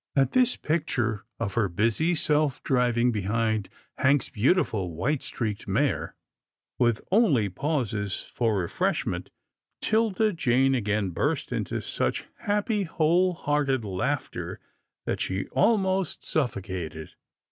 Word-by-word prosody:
At 135 -2 +3
this 250 -1 +3
picture 120 -9 -1
of 100 -4 -2
her 110 -4 +1
busy 115 - +1
self 150 -3 +1
driving 125 -1 +2
behind 110 0 0 0.3
Hank's 140 +1 +3
beautiful 110 - +1
white 135 - 0
streaked 115 -6 -3
mare, - - 0 0.6
with 120 -3 +2
only 165 - +4
pauses 110 - -1
for 115 -4 -1
refreshment, 85 -3 -1 0.5
'Tilda 220 -1 +2
Jane 135 -4 +2
again 105 -5 0
burst - - -1
into - - -2
such - - -1
happy, 210 +1 0
whole 175 +1 +2
hearted 145 -6 0
laughter 95 -2 -3 0.5
that - - -2
she 95 +1 -1
almost 190 -6 +1
suffocated. 95 - -3
125 Hz, 115 wpm, -27 LUFS, 105-160 Hz, 0.6 s, only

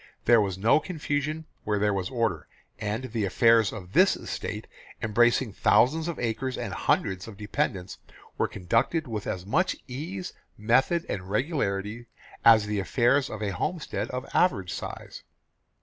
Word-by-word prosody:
There 120 -2 +6
was 95 -3 -2
no 110 +9 +4
confusion 155 -2 -3 0.2
where 105 -1 0
there 105 0 +2
was 95 -2 -2
order, 115 - -1 0.3
and 105 +3 -2
the 110 -2 -1
affairs 115 +2 +4
of 95 -4 -9
this - - +5
estate, - - -5 0.3
embracing 120 +1 +2
thousands 155 +10 +3
of 170 - -3
acres 125 +3 -2
and - - -4
hundreds 95 +2 0
of 110 -3 -10
dependents, 105 -3 -3 0.4
were - - +1
conducted 100 - 0
with 110 -3 -4
as 90 -1 -3
much 160 - +1
ease, 125 - -6 0.2
method 130 +10 +2
and 90 -2 -4
regularity 110 - -1 0.4
as 110 -2 +7
the 105 -1 -1
affairs 125 +7 +2
of 110 0 -5
a 100 - -1
homestead 165 - -3
of 125 +1 -4
average 100 - +2
size. - - -7
115 Hz, 150 wpm, -27 LUFS, 100-135 Hz, 0.4 s, as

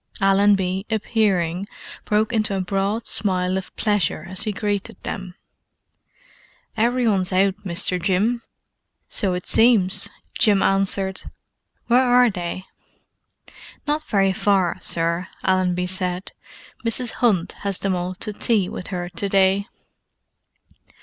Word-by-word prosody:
Allenby, 195 -1 +2
appearing, 200 -5 0 0.4
broke 215 +3 +1
into 215 -3 0
a - - -1
broad 195 +4 -1
smile 185 -2 +1
of 190 -1 -4
pleasure 200 -7 0
as 185 +1 -3
he 215 - 0
greeted 205 -1 -3
them. 185 -2 -6 1.4
"Every 240 +2 +1
one's 190 -3 +2
out, 190 +1 +3
Mr. 180 -1 0
Jim." 205 +6 +1 0.7
"So 190 -4 0
it 180 - -5
seems," 205 -4 +5 0.3
Jim 205 -5 +4
answered. 195 0 0 0.6
"Where 245 +2 +4
are 245 -1 +4
they?" 180 0 -5 1.2
"Not 300 +1 0
very 195 -2 +2
far, 190 -2 +1
sir," 170 +1 0 0.2
Allenby 180 -1 +1
said. 180 0 -3 0.5
"Mrs. 235 +2 -1
'Unt 190 -7 +2
has 200 -2 -2
them 195 -1 -1
all 180 +1 -3
to 210 - -1
tea 205 -3 +1
with 180 - -7
her 175 -2 -4
to 180 +3 -3
day." 195 +1 +2
195 Hz, 125 wpm, -22 LUFS, 185-210 Hz, 1.4 s, seems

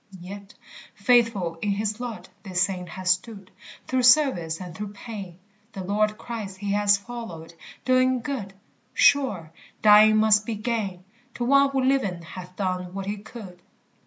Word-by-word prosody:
Yet, 200 +3 -10 0.4
faithful 200 -7 +2
in 205 - -1
his 210 +2 -2
lot 245 -3 -6
this 185 -3 0
saint 180 -2 -3
has 185 +1 0
stood 195 0 -3 0.3
Through 260 0 0
service 245 - +4
and 180 -2 -8
through 205 0 -6
pain; 200 -5 -8 0.4
The 190 - -6
Lord 210 +3 0
Christ 215 -6 -6
he 200 +1 -3
has 205 0 +4
followed, 200 -7 -9 0.3
doing 255 0 +3
good; 230 -8 -5 0.4
Sure, 205 - +3 0.3
dying 215 0 +7
must 215 -1 +4
be 225 +1 -4
gain 210 -5 -3 0.3
To 240 - -2
one 275 +2 +5
who 270 -1 0
living 230 -11 0
hath 180 +2 -10
done 185 -2 -3
what 195 -1 -4
he 205 +1 -3
could. 200 -4 -11
205 Hz, 155 wpm, -25 LUFS, 185-235 Hz, 0.4 s, dying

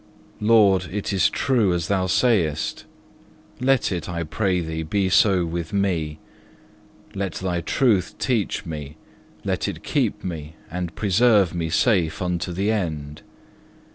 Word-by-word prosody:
2. 105 - -4
Lord, 100 -5 +5
it 100 +1 -3
is 95 - +3
true 115 -9 +1
as 85 -2 -2
Thou 95 -2 +1
sayest; 90 - +1 0.7
let 135 -2 +2
it, 90 -2 -3
I 85 -1 -2
pray 90 +3 0
Thee, 80 -1 -3
be 95 +4 0
so 95 -2 +4
with 85 +4 -4
me; 85 -7 0 1.0
let 100 -1 -3
Thy 90 -2 -2
truth 100 - +1
teach 120 -7 -1
me, 75 -2 -7 0.5
let - - -1
it - - -6
keep - - -1
me 80 -4 -6 0.2
and 90 -1 -4
preserve 105 -2 +3
me 85 -2 -2
safe 95 -3 +2
unto 90 0 -2
the 100 +5 0
end. 75 -8 -3
90 Hz, 140 wpm, -23 LUFS, 80-100 Hz, 1.0 s, Lord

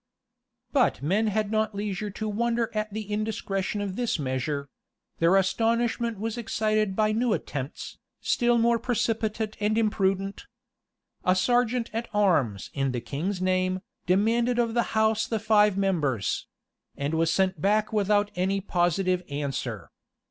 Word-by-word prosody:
But 260 - +2
men 200 +9 +2
had 215 0 0
not 215 -1 0
leisure 205 0 -3
to 215 +2 -5
wonder 230 +2 0
at 215 0 -2
the 215 +1 -4
indiscretion 210 -1 -2
of 195 -2 -3
this 245 0 0
measure: 140 +1 -2 0.5
their 170 +3 +4
astonishment 230 +3 +1
was 225 +3 -3
excited 215 -3 0
by 215 0 +2
new 230 +1 +1
attempts, 135 -5 -5 0.2
still 240 0 +2
more 235 0 +3
precipitate 225 -2 -1
and 210 +1 +1
imprudent. 195 -3 0 0.8
A 185 - +3
serjeant 245 +4 +1
at 230 +1 -3
arms, 145 - +1
in 135 -2 -1
the 120 - -1
king's 170 - -3
name, 185 0 +1 0.3
demanded 230 +6 +2
of 235 -2 +1
the 235 -2 0
house 220 0 +2
the 225 - -1
five 210 -2 +3
members: 150 - 0 0.5
and 140 +2 -2
was 165 0 +2
sent 190 -5 +1
back 210 +3 +2
without 205 0 +2
any 190 +2 0
positive 180 0 +1
answer. 135 - -4
210 Hz, 140 wpm, -26 LUFS, 185-225 Hz, 0.8 s, their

